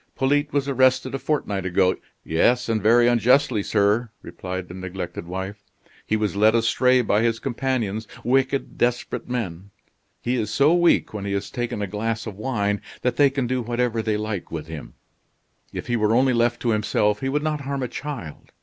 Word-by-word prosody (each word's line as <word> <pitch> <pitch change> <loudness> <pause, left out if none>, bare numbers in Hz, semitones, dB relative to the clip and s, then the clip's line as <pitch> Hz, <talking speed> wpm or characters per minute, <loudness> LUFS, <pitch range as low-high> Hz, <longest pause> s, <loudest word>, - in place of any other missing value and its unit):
"Polyte 145 +2 +1
was 140 -1 0
arrested 130 -1 +2
a 135 - -2
fortnight 130 -9 -1
ago 95 0 +2 0.2
" - - -45
"Yes, 120 +10 +2
and 110 -2 0
very 120 +3 +5
unjustly, 120 0 +3
sir," 105 +3 +1
replied 90 +1 -6
the 90 - -10
neglected 90 -2 -6
wife. 95 +3 -5 0.5
"He 110 - +1
was 105 -2 -1
led 110 +2 +4
astray 125 +2 +3
by 105 -1 +2
his 115 -1 +1
companions, 115 -4 -2 0.2
wicked, 135 +2 0
desperate 120 0 -1
men. 100 -6 -4 0.5
He 125 +1 -1
is 110 -3 -1
so 140 +8 +4
weak 175 -8 +3
when 100 -2 -5
he 100 - -2
has 100 - -3
taken 120 -4 -3
a - - 0
glass 115 +3 -3
of 110 -4 -6
wine 105 -3 -1 0.2
that 125 - 0
they 145 -1 +6
can 135 -1 -2
do 125 +1 -1
whatever 120 -1 -1
they 110 -1 0
like 105 -3 -4
with 80 -2 -4
him. 80 -2 -9 0.8
If - - -5
he 120 - -1
were 110 0 +2
only 130 +1 +4
left 120 0 +1
to 120 - +2
himself 105 -1 +1
he 135 - -2
would 150 +2 0
not 155 -1 -1
harm 140 -1 -3
a - - -1
child. 130 - -7
115 Hz, 195 wpm, -23 LUFS, 100-130 Hz, 0.8 s, they